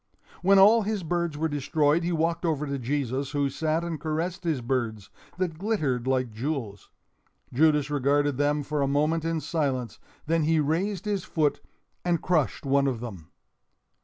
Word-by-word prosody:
When 195 Hz, +2 st, +5 dB
all 210 Hz, +4 st, +7 dB
his 210 Hz, -2 st, -2 dB
birds 170 Hz, -2 st, -1 dB
were 160 Hz, +2 st, 0 dB
destroyed, 145 Hz, +2 st, +1 dB
he 175 Hz, -, -1 dB
walked 165 Hz, +1 st, 0 dB
over 155 Hz, -3 st, 0 dB
to 140 Hz, -1 st, -3 dB
Jesus, 135 Hz, +1 st, -2 dB
who 140 Hz, -1 st, 0 dB
sat 160 Hz, +3 st, -1 dB
and 165 Hz, -4 st, -4 dB
caressed 165 Hz, +4 st, -2 dB
his 160 Hz, -5 st, 0 dB
birds—that 125 Hz, -, -4 dB
glittered 150 Hz, -, -1 dB
like 130 Hz, -2 st, +1 dB
jewels. 115 Hz, -, -4 dB, 0.6 s
Judas 150 Hz, +1 st, +3 dB
regarded 145 Hz, 0 st, +1 dB
them 145 Hz, +1 st, +1 dB
for 150 Hz, +1 st, -2 dB
a 140 Hz, -, +2 dB
moment 150 Hz, +4 st, +1 dB
in 165 Hz, 0 st, -1 dB
silence, 135 Hz, -8 st, -2 dB, 0.3 s
then 165 Hz, +1 st, +1 dB
he 160 Hz, 0 st, +3 dB
raised 175 Hz, +7 st, -1 dB
his 205 Hz, -3 st, -1 dB
foot 150 Hz, -3 st, 0 dB, 0.4 s
and 175 Hz, -2 st, +1 dB
crushed 150 Hz, -, 0 dB
one 140 Hz, 0 st, +3 dB
of 125 Hz, -4 st, -1 dB
them. 100 Hz, -9 st, -8 dB
150 Hz, 160 wpm, -26 LUFS, 135-165 Hz, 0.6 s, all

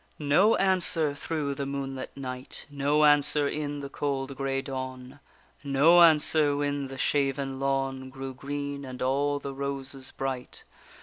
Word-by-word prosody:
No 155 Hz, +9 st, +4 dB
answer 175 Hz, -6 st, +3 dB
through 145 Hz, 0 st, -3 dB
the 140 Hz, 0 st, -4 dB
moonlit 135 Hz, -1 st, -5 dB
night; 130 Hz, -1 st, -7 dB
No 145 Hz, +2 st, +2 dB
answer 145 Hz, 0 st, +4 dB
in 145 Hz, -1 st, -3 dB
the 140 Hz, -, -5 dB
cold 140 Hz, -1 st, -3 dB
grey 135 Hz, 0 st, -1 dB
dawn; 130 Hz, 0 st, -6 dB, 0.4 s
No 145 Hz, +5 st, +5 dB
answer 155 Hz, -2 st, +5 dB
when 145 Hz, -1 st, -1 dB
the 135 Hz, 0 st, -8 dB
shaven 135 Hz, 0 st, 0 dB
lawn 135 Hz, -1 st, -1 dB
Grew 135 Hz, 0 st, -7 dB
green, 140 Hz, +1 st, -5 dB
and 130 Hz, -1 st, -8 dB
all 140 Hz, +2 st, +1 dB
the 140 Hz, -1 st, -6 dB
roses 135 Hz, -1 st, -5 dB
bright. 130 Hz, -2 st, -5 dB
140 Hz, 140 wpm, -27 LUFS, 135-145 Hz, 0.4 s, No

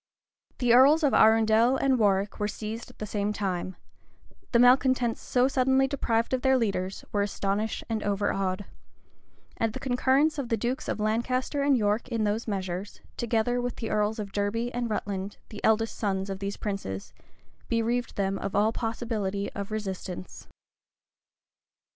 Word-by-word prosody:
[*] -, -, -45 dB
The 245 Hz, -2 st, +3 dB
earls 285 Hz, +6 st, +6 dB
of 285 Hz, -, +3 dB
Arundel 225 Hz, +3 st, +5 dB
and 265 Hz, -2 st, +2 dB
Warwick 200 Hz, -1 st, +1 dB
were 210 Hz, -, 0 dB
seized 220 Hz, +2 st, -6 dB
at -, -, -17 dB
the 215 Hz, -, -4 dB
same 205 Hz, 0 st, -1 dB
time: 185 Hz, -3 st, -3 dB, 0.8 s
the 235 Hz, -, +4 dB
malecontents 250 Hz, -1 st, +4 dB
so 250 Hz, 0 st, +2 dB
suddenly 265 Hz, 0 st, +3 dB
deprived 235 Hz, -4 st, 0 dB
of 255 Hz, -, +1 dB
their 265 Hz, 0 st, +4 dB
leaders, 195 Hz, -5 st, -2 dB
were 205 Hz, -, +1 dB
astonished 200 Hz, +1 st, -1 dB
and 225 Hz, -2 st, -2 dB
overawed; 195 Hz, -1 st, -1 dB, 0.9 s
and 225 Hz, -1 st, 0 dB
the -, -, -5 dB
concurrence 270 Hz, +4 st, +2 dB
of 255 Hz, -4 st, -4 dB
the 230 Hz, -, +1 dB
dukes 245 Hz, +6 st, -2 dB
of -, -, -2 dB
Lancaster 255 Hz, +6 st, 0 dB
and 280 Hz, -1 st, +3 dB
York 210 Hz, +1 st, 0 dB
in 230 Hz, -3 st, -1 dB
those 210 Hz, +3 st, -1 dB
measures, 190 Hz, -1 st, -4 dB, 0.2 s
together 240 Hz, +1 st, 0 dB
with 245 Hz, -1 st, -3 dB
the 225 Hz, -, -5 dB
earls 210 Hz, +1 st, +1 dB
of 205 Hz, -2 st, -5 dB
Derby 215 Hz, +5 st, -1 dB
and 240 Hz, -1 st, -2 dB
Rutland, 200 Hz, -2 st, -3 dB
the 210 Hz, -, -9 dB
eldest 220 Hz, +1 st, +2 dB
sons 195 Hz, -2 st, -2 dB
of 190 Hz, -, -5 dB
these 200 Hz, 0 st, -4 dB
princes,[] 195 Hz, -, -5 dB, 0.6 s
bereaved 235 Hz, +1 st, 0 dB
them 195 Hz, -1 st, -1 dB
of 195 Hz, -, -4 dB
all 210 Hz, +2 st, +3 dB
possibility 225 Hz, -4 st, -2 dB
of 200 Hz, 0 st, -5 dB
resistance. 190 Hz, -4 st, -6 dB
220 Hz, 160 wpm, -27 LUFS, 200-245 Hz, 0.9 s, earls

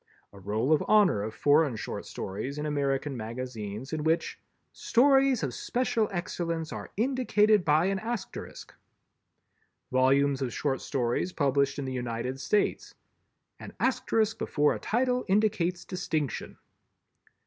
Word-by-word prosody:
A 100 Hz, -, -12 dB
Roll 110 Hz, +9 st, 0 dB
of 155 Hz, -, +2 dB
Honor 205 Hz, -, +4 dB
of 110 Hz, +1 st, -5 dB
Foreign 145 Hz, -3 st, +3 dB
Short 110 Hz, -, -6 dB
Stories 110 Hz, +9 st, -5 dB
in 150 Hz, -, -3 dB
American 140 Hz, -1 st, -1 dB
Magazines 115 Hz, +1 st, -6 dB
in 155 Hz, -1 st, -2 dB
which 160 Hz, +2 st, 0 dB, 0.3 s
"Stories 270 Hz, -, +3 dB
of 135 Hz, -4 st, -2 dB
special 235 Hz, -, 0 dB
excellence 170 Hz, -3 st, -3 dB
are -, -, -7 dB
indicated 215 Hz, -4 st, +3 dB
by 155 Hz, +2 st, +3 dB
an 195 Hz, 0 st, 0 dB
Asterisk." 220 Hz, -2 st, -6 dB, 1.2 s
Volumes 135 Hz, +2 st, +3 dB
of 130 Hz, -3 st, -1 dB
short 135 Hz, +1 st, -1 dB
stories 125 Hz, +7 st, -1 dB
published 140 Hz, -1 st, +1 dB
in 140 Hz, -, -3 dB
the 130 Hz, -, -4 dB
United 125 Hz, +1 st, -3 dB
States. 170 Hz, +10 st, 0 dB, 0.6 s
"_An -, -, -9 dB
Asterisk 220 Hz, -1 st, +1 dB
before 150 Hz, 0 st, +2 dB
a -, -, -5 dB
title 250 Hz, +2 st, 0 dB
indicates 190 Hz, -3 st, +1 dB
distinction. 160 Hz, -, -3 dB
150 Hz, 130 wpm, -28 LUFS, 130-200 Hz, 1.2 s, Honor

